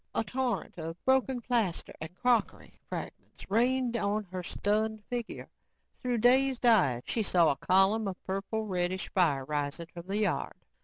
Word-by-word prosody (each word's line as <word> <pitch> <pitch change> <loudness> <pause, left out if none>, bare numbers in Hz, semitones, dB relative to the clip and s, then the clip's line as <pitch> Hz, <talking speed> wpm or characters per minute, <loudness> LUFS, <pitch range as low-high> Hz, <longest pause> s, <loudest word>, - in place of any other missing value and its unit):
A - - +2
torrent 250 -3 -2
of 165 +1 -5
broken 260 -1 +2
plaster, 230 -8 -1
and 160 +3 -7
crockery 245 +1 0 0.2
fragments - - -7
rained 245 +2 +2
on 210 -1 0
her 185 -1 -4
stunned 215 +4 -1
figure. 240 -2 -5 0.5
Through 250 -2 0
dazed 255 +2 +3
eyes, 150 - +4
she 230 - -1
saw 175 -6 +4
a - - -1
column 195 +4 +3
of 190 -2 -5
purple 195 +3 -3
reddish 185 -1 -1
fire 150 -8 +2
rising 145 +3 -3
from 170 0 -9
the 200 +2 -1
yard. 215 -1 -1
210 Hz, 155 wpm, -30 LUFS, 180-240 Hz, 0.5 s, eyes